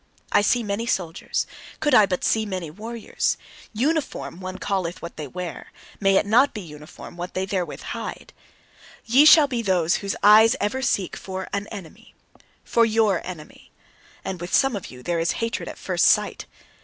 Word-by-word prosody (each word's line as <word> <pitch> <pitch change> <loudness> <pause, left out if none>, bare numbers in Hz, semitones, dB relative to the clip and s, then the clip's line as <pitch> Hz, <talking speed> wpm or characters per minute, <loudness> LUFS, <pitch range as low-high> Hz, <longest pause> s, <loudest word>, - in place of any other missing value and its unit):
I - - +5
see 235 +3 +2
many 210 +2 -3
soldiers; 180 -8 -2 0.3
could 295 -3 +1
I 215 -4 +7
but 180 -2 -2
see 220 - +2
many 185 -6 -5
warriors! 225 +5 -3 0.3
"Uniform" 270 - -2
one 185 0 -6
calleth 180 -3 -2
what 170 - -8
they 150 - -6
wear; 175 +4 -7 0.3
may 195 -1 +3
it 195 - +3
not 240 +6 +4
be 210 - -4
uniform 150 0 -11
what 175 +1 -6
they 185 +1 -1
therewith 190 -3 -3
hide! - - -6 0.7
Ye 260 +6 +5
shall 310 -1 +9
be 245 -4 -2
those 185 -5 +2
whose 200 -1 -3
eyes 220 +4 +7
ever 245 +6 -1
seek 200 -8 0
for 190 -1 -6
an 200 +1 -2
enemy 195 -7 -11 0.5
for 235 - +2
YOUR 220 -5 +2
enemy. 165 -4 -10 0.5
And 185 -2 -4
with 175 - -6
some 270 -4 +3
of 195 - -6
you 125 -1 -12
there 170 +2 -1
is 165 0 +1
hatred 230 +1 -3
at - - -9
first - - 0
sight. - - +2
200 Hz, 180 wpm, -23 LUFS, 175-230 Hz, 0.7 s, shall